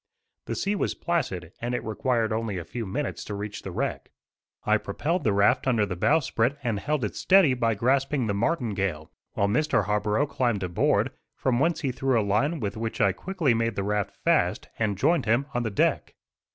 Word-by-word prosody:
The -, -, -2 dB
sea 200 Hz, +1 st, 0 dB
was 205 Hz, -, -1 dB
placid, 95 Hz, -, -2 dB
and 120 Hz, +1 st, -1 dB
it -, -, -3 dB
required 115 Hz, 0 st, 0 dB
only 110 Hz, -3 st, -2 dB
a 85 Hz, -, -5 dB
few 115 Hz, +4 st, -5 dB
minutes 145 Hz, +10 st, -3 dB
to 105 Hz, -, -5 dB
reach 105 Hz, +1 st, -5 dB
the -, -, -6 dB
wreck. 90 Hz, -, -3 dB, 0.6 s
I -, -, +4 dB
propelled 170 Hz, +4 st, -2 dB
the 110 Hz, -, +2 dB
raft 100 Hz, +7 st, +3 dB
under 115 Hz, -5 st, +3 dB
the 90 Hz, -2 st, -4 dB
bow 155 Hz, -, +3 dB
sprit 125 Hz, +1 st, 0 dB
and 115 Hz, -5 st, -1 dB
held 150 Hz, +2 st, -1 dB
it 105 Hz, -, -5 dB
steady 185 Hz, -8 st, +5 dB
by 115 Hz, -3 st, +1 dB
grasping 135 Hz, +3 st, +1 dB
the 105 Hz, -, 0 dB
martingale, 100 Hz, -, -1 dB, 0.2 s
while 100 Hz, -, +1 dB
Mr. 130 Hz, -1 st, +1 dB
Harborough 105 Hz, +5 st, +1 dB
climbed 120 Hz, -8 st, -1 dB
aboard, 90 Hz, -1 st, +1 dB, 0.2 s
from 125 Hz, -2 st, 0 dB
whence 165 Hz, +4 st, +1 dB
he 135 Hz, -4 st, 0 dB
threw 130 Hz, -1 st, +1 dB
a -, -, +1 dB
line 140 Hz, +11 st, +1 dB
with 105 Hz, -2 st, -3 dB
which 115 Hz, +2 st, -4 dB
I 100 Hz, -4 st, +4 dB
quickly 160 Hz, -, 0 dB
made 115 Hz, -1 st, 0 dB
the 100 Hz, -, -1 dB
raft 105 Hz, 0 st, -1 dB
fast, -, -, +1 dB
and 105 Hz, -3 st, 0 dB
joined 165 Hz, -, +2 dB
him 120 Hz, +5 st, +2 dB
on 120 Hz, -, 0 dB
the 115 Hz, -, -1 dB
deck. 100 Hz, -, 0 dB
115 Hz, 205 wpm, -26 LUFS, 100-135 Hz, 0.6 s, steady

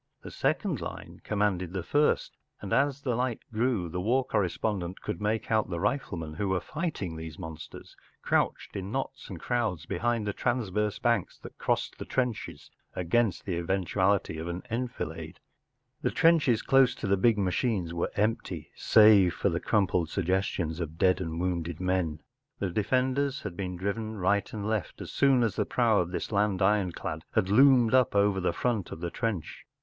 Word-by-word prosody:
The -, -, -8 dB
second -, -, -1 dB
line -, -, -8 dB
commanded 100 Hz, -4 st, 0 dB
the 95 Hz, -3 st, -3 dB
first, 145 Hz, -, +1 dB, 0.2 s
and 100 Hz, -, -4 dB
as 140 Hz, 0 st, +1 dB
the 125 Hz, -, 0 dB
light 125 Hz, -1 st, -1 dB
grew 110 Hz, -5 st, 0 dB
the 90 Hz, +2 st, -4 dB
war 125 Hz, +6 st, +2 dB
correspondent 95 Hz, -3 st, -1 dB
could 105 Hz, -, -5 dB
make 110 Hz, +1 st, -1 dB
out 110 Hz, -3 st, +2 dB
the 85 Hz, -2 st, -3 dB
riflemen 85 Hz, -, -2 dB
who 95 Hz, +5 st, -2 dB
were 95 Hz, -1 st, +1 dB
fighting 145 Hz, -, -4 dB
these 80 Hz, -1 st, -7 dB
monsters, 80 Hz, -3 st, -9 dB, 0.3 s
crouched -, -, 0 dB
in 95 Hz, 0 st, -4 dB
knots 135 Hz, +1 st, -4 dB
and 95 Hz, -5 st, -7 dB
crowds 110 Hz, -10 st, -1 dB
behind 115 Hz, +3 st, -1 dB
the 105 Hz, -, -1 dB
transverse 105 Hz, -4 st, -1 dB
banks 115 Hz, -7 st, 0 dB
that -, -, -10 dB
crossed -, -, -1 dB
the -, -, -5 dB
trenches 125 Hz, -4 st, -3 dB, 0.2 s
against 95 Hz, +3 st, +1 dB
the 95 Hz, -, -2 dB
eventuality 95 Hz, 0 st, 0 dB
of 80 Hz, -, -5 dB
an 85 Hz, +1 st, -4 dB
enfilade. 125 Hz, +1 st, -4 dB, 0.6 s
The -, -, +1 dB
trenches 150 Hz, -9 st, +3 dB
close 135 Hz, -2 st, +4 dB
to -, -, -6 dB
the 100 Hz, 0 st, +3 dB
big 110 Hz, +3 st, +3 dB
machines 95 Hz, -2 st, 0 dB
were 85 Hz, -, -1 dB
empty 110 Hz, +2 st, -1 dB
save 105 Hz, -5 st, +6 dB
for -, -, +1 dB
the 85 Hz, -1 st, -1 dB
crumpled 90 Hz, -6 st, +1 dB
suggestions 90 Hz, -3 st, -1 dB
of 80 Hz, -2 st, -5 dB
dead 95 Hz, +1 st, +3 dB
and 80 Hz, -2 st, -4 dB
wounded 85 Hz, -2 st, -2 dB
men; 90 Hz, -4 st, -1 dB, 0.4 s
the 95 Hz, -3 st, -2 dB
defenders 130 Hz, +7 st, 0 dB
had 100 Hz, -5 st, -5 dB
been 90 Hz, -1 st, -4 dB
driven 110 Hz, +3 st, -3 dB
right 100 Hz, +2 st, +1 dB
and 105 Hz, -1 st, -4 dB
left 110 Hz, -6 st, -2 dB
as -, -, -7 dB
soon 135 Hz, -3 st, +4 dB
as 110 Hz, -4 st, -1 dB
the -, -, +1 dB
prow 115 Hz, -4 st, +3 dB
of 85 Hz, -, 0 dB
this 90 Hz, -, -4 dB
land 100 Hz, -2 st, +1 dB
ironclad 95 Hz, -3 st, 0 dB
had 95 Hz, -, +2 dB
loomed 125 Hz, +1 st, +6 dB
up 130 Hz, -4 st, +4 dB
over 100 Hz, -1 st, +3 dB
the 90 Hz, -, +1 dB
front 115 Hz, -7 st, -1 dB
of -, -, -6 dB
the 85 Hz, 0 st, -4 dB
trench. 110 Hz, -5 st, -3 dB
100 Hz, 175 wpm, -28 LUFS, 90-115 Hz, 0.6 s, save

